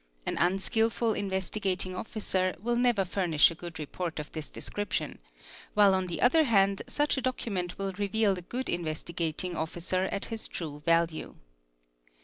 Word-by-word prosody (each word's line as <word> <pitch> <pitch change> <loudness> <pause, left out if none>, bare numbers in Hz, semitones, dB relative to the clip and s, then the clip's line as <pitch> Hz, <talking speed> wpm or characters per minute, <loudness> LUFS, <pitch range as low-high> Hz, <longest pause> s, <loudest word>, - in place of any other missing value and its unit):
An - - -1
unskilful 220 +5 +2
Investigating 190 -1 -1
FA 185 - -4
Officer 190 -4 -1
will 240 +5 0
never 240 -5 +3
furnish 175 -4 +4
a - - -4
good 170 0 -8
report 160 +2 -4
of 150 -1 -5
this 155 -2 -5
description, 205 0 -3 0.6
while 205 -2 +6
on 185 -1 +1
the 175 - -2
other 310 +6 +5
hand 195 -5 +3
such 295 -1 +1
a - - 0
document 205 -8 -2
will 195 -1 -2
reveal 205 +1 +2
a 180 - -6
good 250 +9 -4
Investigating 170 +1 -2
Officer 175 +3 -1
at 200 +3 -2
lis 225 -1 -2
true 150 -4 -6
value. 165 -1 +2
190 Hz, 155 wpm, -29 LUFS, 170-215 Hz, 0.6 s, while